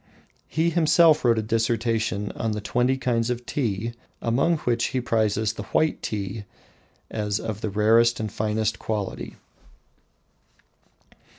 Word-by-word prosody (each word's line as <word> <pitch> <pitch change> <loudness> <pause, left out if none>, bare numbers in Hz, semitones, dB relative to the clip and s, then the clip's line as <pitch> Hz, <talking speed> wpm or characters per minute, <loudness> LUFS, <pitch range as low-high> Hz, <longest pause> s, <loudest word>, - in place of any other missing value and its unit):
He 165 +2 +1
himself 160 -1 +5
wrote 120 -2 +4
a 110 - 0
dissertation 115 -2 0
on 110 -1 -2
the 105 - -3
twenty 125 +5 +1
kinds 120 -3 0
of 125 0 -3
tea, 115 -4 -2 0.3
among 135 +9 +1
which 120 -1 +1
he 130 - -1
prizes 110 -3 +1
the - - -6 0.2
"white 155 0 +1
tea" 105 0 -4 0.7
as 105 -1 -1
of 110 -2 -5
the 110 - -2
rarest 115 +3 +3
and 110 -2 -3
finest 110 +1 -1
quality. 105 -3 -4
115 Hz, 130 wpm, -24 LUFS, 105-125 Hz, 0.7 s, himself